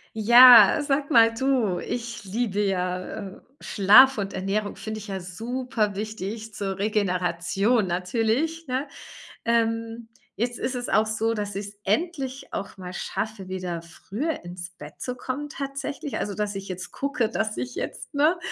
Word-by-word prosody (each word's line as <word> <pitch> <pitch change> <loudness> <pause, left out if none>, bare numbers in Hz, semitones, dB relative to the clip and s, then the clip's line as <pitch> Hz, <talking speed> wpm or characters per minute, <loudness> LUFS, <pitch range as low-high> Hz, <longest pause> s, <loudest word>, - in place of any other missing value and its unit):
Ja, 235 -1 +9
sag 285 0 -1
mal, 230 -3 +6
du, 245 -7 +1
ich 235 -2 -5
liebe 205 0 -1
ja, 185 -1 -1 0.2
äh 190 - -14 0.2
Schlaf 230 +6 +6
und 195 -1 -3
Ernährung 205 +2 -2
finde 215 0 -6
ich 210 - -10
ja 195 -1 -4
super 225 +3 -3
wichtig 215 +1 -5
zur 195 -2 -3
Regeneration 195 +1 +1
natürlich, 230 - -1
ne? 260 +3 -2 0.6
Ähm. 230 0 0 0.3
Jetzt 240 +1 -1
ist 255 - -2
es 245 0 -4
auch 215 - +3
so, 220 +1 0
dass 205 -2 -4
ich 200 0 -4
es 200 0 -12
endlich 270 - -2
auch 200 - -5
mal 180 -1 -8
schaffe, 205 +1 -4
wieder 180 -3 -4
früher 205 - -5
ins 175 +1 -8
Bett 150 -4 -12
zu 250 -1 -4
kommen 265 +4 -4
tatsächlich 275 0 -5
also, 205 - -3
dass 205 +1 -2
ich 195 0 -6
jetzt 185 0 -6
gucke, 275 -5 -1
dass 220 -1 -2
ich 255 0 -4
jetzt, - - -6
ne, 305 +5 +3
220 Hz, 160 wpm, -25 LUFS, 195-250 Hz, 0.6 s, Ja